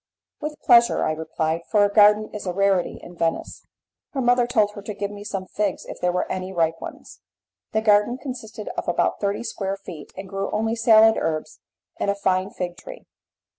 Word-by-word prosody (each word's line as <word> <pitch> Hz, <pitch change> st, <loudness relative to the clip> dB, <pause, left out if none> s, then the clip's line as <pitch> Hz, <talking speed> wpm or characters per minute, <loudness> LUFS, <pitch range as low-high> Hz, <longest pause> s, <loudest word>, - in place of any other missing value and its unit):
"With 300 Hz, 0 st, -5 dB
pleasure," 235 Hz, 0 st, +5 dB
I -, -, +1 dB
replied, 160 Hz, +1 st, -2 dB
"for 210 Hz, -3 st, +4 dB
a 205 Hz, -, -2 dB
garden 210 Hz, 0 st, +5 dB
is 210 Hz, -2 st, -6 dB
a 180 Hz, -, -1 dB
rarity 195 Hz, -1 st, +1 dB
in 175 Hz, -, -11 dB
Venice." 165 Hz, -1 st, -3 dB, 0.5 s
Her 270 Hz, -, -1 dB
mother 245 Hz, 0 st, +3 dB
told 215 Hz, -4 st, +2 dB
her 205 Hz, -, -9 dB
to 205 Hz, +1 st, -6 dB
give 200 Hz, 0 st, -3 dB
me 205 Hz, 0 st, -9 dB
some 195 Hz, -2 st, -4 dB
figs 200 Hz, 0 st, -2 dB
if -, -, -9 dB
there 180 Hz, -, +2 dB
were 180 Hz, -, 0 dB
any 185 Hz, 0 st, -4 dB
ripe 165 Hz, -2 st, 0 dB
ones. -, -, -9 dB, 0.5 s
The 220 Hz, -, +1 dB
garden 210 Hz, +3 st, +3 dB
consisted 240 Hz, -5 st, -7 dB
of -, -, -5 dB
about -, -, +1 dB
thirty 200 Hz, +2 st, -1 dB
square 195 Hz, -4 st, -3 dB
feet, 170 Hz, -6 st, -10 dB
and 190 Hz, +1 st, -7 dB
grew 195 Hz, +1 st, -3 dB
only 220 Hz, +2 st, 0 dB
salad 225 Hz, -1 st, +6 dB
herbs 155 Hz, -1 st, -3 dB, 0.4 s
and -, -, 0 dB
a 200 Hz, -, +1 dB
fine 190 Hz, -1 st, 0 dB
fig 175 Hz, -3 st, -5 dB
tree. -, -, -11 dB
205 Hz, 200 wpm, -23 LUFS, 185-220 Hz, 0.5 s, salad